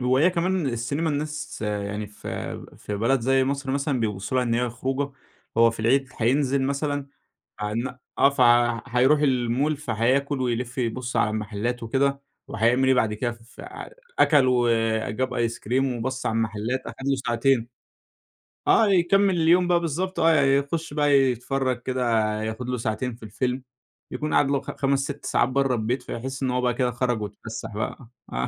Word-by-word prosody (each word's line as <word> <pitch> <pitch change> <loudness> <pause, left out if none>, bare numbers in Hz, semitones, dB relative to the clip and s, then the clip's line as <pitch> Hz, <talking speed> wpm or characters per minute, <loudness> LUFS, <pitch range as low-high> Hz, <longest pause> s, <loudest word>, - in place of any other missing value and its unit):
وهي 130 +7 +3
كمان 180 -1 0
السينما 135 +6 -1
الناس 150 -4 -4
يعني 105 0 -3
في 105 0 -7
في 105 - -6
بلد 120 +4 +2
زي 135 +2 +3
مصر 140 0 -2
مثلًا 140 -1 0
بيبصوا 105 +2 -2
لها 125 - +2
إن 115 - 0
هي 120 0 0
خروجة، 135 +3 -3 0.4
هو 115 0 +6
في 115 - -7
العيد 130 +4 +2
هينزل 135 +3 +2
مثلًا، 140 +1 -1 0.5
عن 120 +5 -3 0.2
آه، 140 - +6
فهيروح 125 +2 +3
المول 135 +2 +1
فهياكل 135 +2 0
ويلف 125 +1 -2
يبص 125 0 -2
على 105 - +2
المحلات 110 +3 -3
وكده، 140 +4 0 0.3
وهيعمل 120 +4 +2
إيه 130 - +5
بعد 110 -3 +1
كده؟ 120 +2 -2
ف 115 +1 -15 0.6
أكل 145 -4 +5
وجاب 115 0 +1
أيس 115 -1 -1
كريم 130 +2 0
وبَص 130 +3 -3
على 115 - +1
المحلات، 115 +3 -1
أخد 135 - -7
له 135 - +2
ساعتين 120 0 +2 1.0
آه 220 - +5
يكمل 195 +1 +3
اليوم 175 +2 +4
بقى 175 -1 +3
بالضبط، 170 +3 -2
آه 160 -2 +5
يخش 140 +3 +1
بقى 145 -1 +2
يتفرج 130 -1 +1
كده، 130 0 -2 0.4
ياخد 110 +3 -4
له 125 - -1
ساعتين 115 +2 -2
في 115 - -17
الفيلم، 125 +4 -2 0.5
يكون 155 0 -3
قَعد 140 - +3
له 140 - +1
خ - - -6
خمس، 140 0 +1
6 140 +1 -5
ساعات 120 - +2
برّه 135 -1 +1
البيت، 120 +3 -1
فيحس 130 +3 -5
إنّه 130 -1 0
هو 125 - +1
بقى 125 -1 +1
كده 125 0 0
خرج 120 -2 -1
واتفسح 110 +2 -7
بقى 110 +3 -4 0.3
آه 60 +1 -1
130 Hz, 165 wpm, -25 LUFS, 115-140 Hz, 1.0 s, هو